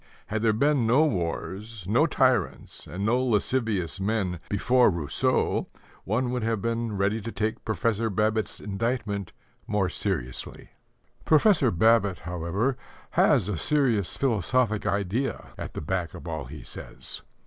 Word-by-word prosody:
Had 110 +1 -2
there 115 -1 +4
been 130 +2 +2
no 135 +7 +5
wars, 95 - -3
no 125 +11 +4
tyrants, 130 - 0
and 90 +6 -4
no 125 +4 +2
lascivious 110 -6 0
men 95 -4 -1
before 125 +5 +4
Rousseau, 85 -6 0 0.4
one 120 +5 0
would 125 -1 -1
have 110 -1 0
been 115 0 -2
ready 100 +3 +1
to 115 - -5
take 110 0 -2
Professor 110 +2 0
Babbitt's 110 +2 0
indictment 105 -1 -2 0.4
more 105 -3 +1
seriously. 65 -7 -4 0.5
Professor 160 - +4
Babbitt, 100 0 +3
however, 90 +9 -1 0.3
has - - +4
a 105 -4 -2
serious 120 - +1
philosophic 115 -2 +1
idea 100 +7 -1
at - - -7
the - - -3
back 85 +1 -2
of - - -9
all - - -4
he - - -9
says. - - -6
110 Hz, 135 wpm, -26 LUFS, 95-120 Hz, 0.5 s, no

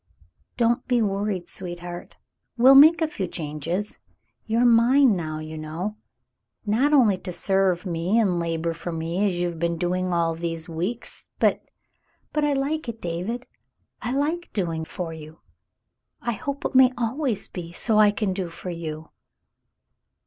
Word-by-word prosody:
"Don't 240 +1 +1
be 245 -1 +2
worried, 200 -3 -1
sweetheart; 175 -1 -6 0.4
we'll 255 +3 +8
make 315 +4 +8
a - - +2
few 195 -11 -4
changes. 165 +5 -4 0.5
You're 230 +2 +2
mine 240 +1 +5
now, 155 -3 -4
you 155 0 -7
know 170 +7 -4 0.3
— - - -57 0.3
not 235 +8 +2
only 230 -10 +4
to 180 - -6
serve 190 0 +1
me 175 +4 0
and 190 -6 +2
labor 165 0 -1
for 170 +1 -6
me 165 +5 -1
as 185 - -1
you 175 - +1
have 170 -2 -6
been 170 0 0
doing 180 +2 -1
all 170 -1 +1
these 165 0 -4
weeks, 180 +9 -5
but - - +2 0.2
— - - -47
" - - -42
"But 300 - +1
I 295 -1 +2
like 280 0 -1
it, 225 -1 -6
David. 185 +8 -4 0.6
I 245 - -2
like 315 +5 -1
doing 165 -5 -2
for 170 -1 -5
you. 155 0 -11 0.8
I 235 - -2
hope 280 +6 -5
it - - -1
may 260 -1 +7
always 240 -1 -1
be 170 -2 -7
so 215 +4 +2
I 210 -1 +7
can 205 -2 -1
do 185 -2 -3
for 180 +2 -7
you." 160 -2 -6
190 Hz, 170 wpm, -24 LUFS, 170-235 Hz, 0.8 s, we'll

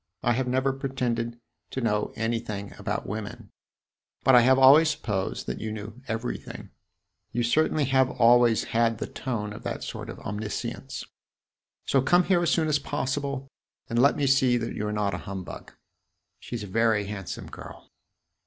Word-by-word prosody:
I 120 - +3
have 130 +1 -1
never 130 +2 +1
pretended 120 -3 -2 0.3
to - - -4
know 105 -4 0
anything 115 -3 -3
about - - -3
women, 105 0 -6 0.7
but 135 - +5
I 125 - +9
have 130 +2 +5
always 140 +4 +7
supposed 105 -10 -2
that 60 +1 -4
you 110 - -3
knew 110 +3 -7
everything. 115 +2 -5 0.6
You 120 +1 0
certainly 150 +4 +2
have 130 -1 +3
always 120 -1 +4
had 115 -1 +1
the - - -3
tone 105 -5 -4
of - - -9
that - - -4
sort - - -6
of - - -7
omniscience. 105 0 -5 0.8
So 135 - +3
come 175 +7 +4
here 180 -1 +2
as 170 - +2
soon 160 -2 +2
as 150 -1 +2
possible 140 0 -3 0.4
and 115 - +1
let 140 +2 +5
me 145 - +1
see 130 -2 +4
that 115 -1 -3
you 105 - -3
are - - -2
not 105 -2 0
a 85 - -3
humbug. 95 0 -8 0.7
She 120 - -6
's 110 - -6
a - - -6
very 110 0 +2
handsome 100 -3 -6
girl." - - -11
120 Hz, 170 wpm, -26 LUFS, 105-135 Hz, 0.8 s, I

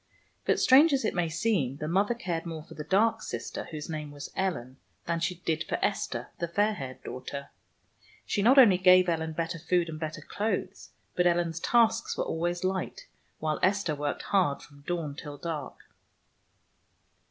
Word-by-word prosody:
But, - - +2
strange 285 +4 +6
as 265 -4 +1
it - - 0
may 175 -2 0
seem, 160 - 0
the 150 - -4
mother 200 +7 +2
cared 175 -9 -3
more 160 -2 -6
for - - -13
the 150 - -6
dark 205 +8 +2
sister, - - -5
whose 155 -2 -7
name 155 -2 -5
was 145 0 -8
Ellen, 135 -10 -2 0.3
than 170 0 -1
she 170 +2 -1
did 160 -1 0
for - - -1
Esther, - - -2
the 170 - -1
fair 205 +5 +2
haired 130 -8 -7
daughter. 140 +2 -6 0.8
She 205 - 0
not 250 +7 +5
only 205 -9 +8
gave 185 0 +6
Ellen 160 -2 -1
better 165 +1 -3
food 175 +1 +1
and 155 -1 -6
better 155 -1 -4
clothes, 205 -1 -3 0.3
but 180 0 +3
Ellen's 170 -1 +1
tasks 230 +2 +2
were - - 0
always 175 +2 -2
light, 190 - -2 0.3
while 155 -1 -1
Esther 190 -4 +2
worked 145 0 -3
hard 180 -8 +1
from 145 -1 -16
dawn 165 -5 -2
till 145 0 -8
dark. 150 -3 -5
170 Hz, 175 wpm, -29 LUFS, 155-195 Hz, 0.8 s, only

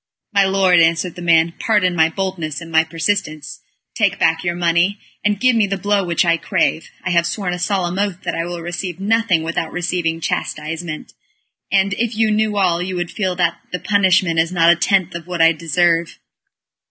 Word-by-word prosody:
"My 200 -1 +4
lord," 190 -2 +3
answered 165 +1 +2
the 180 - -10
man, 165 -1 +3
"pardon 205 -5 +1
my 160 -1 +3
boldness 170 -4 -4
and 165 -1 -10
my 160 0 +4
persistence. 160 -5 -3 0.3
Take - - +1
back 165 +1 +1
your 175 -1 -1
money, 175 +3 +1 0.3
or 210 0 +2
give 250 +4 +2
me 215 -3 +2
the 195 0 -2
blow 205 +1 0
which 175 0 0
I 170 -1 +3
crave. 160 - -1
I 180 - -2
have 170 -1 +2
sworn 190 -4 -3
a 180 - -5
solemn 185 -1 -1
oath 200 -3 -2
that - - -2
I 165 - -2
will 175 0 -6
receive 175 +1 -5
nothing 205 -4 +1
without 165 0 -3
receiving 175 -2 -2
chastisement, 155 0 -4 0.6
and 195 0 +2
if 235 -1 -1
you 220 -1 +2
knew 215 -1 0
all, 175 -3 +2
you 185 +1 -4
would 175 -1 -3
feel 190 -4 -2
that 170 -2 0
the 180 - -3
punishment 185 -4 +2
is 165 +1 +1
not 170 -2 +4
a - - +4
tenth 185 +1 +1
part 170 - -6
of 165 - -24
what 180 -1 -4
I 165 0 +6
deserve." 170 +1 0
175 Hz, 200 wpm, -18 LUFS, 165-195 Hz, 0.6 s, I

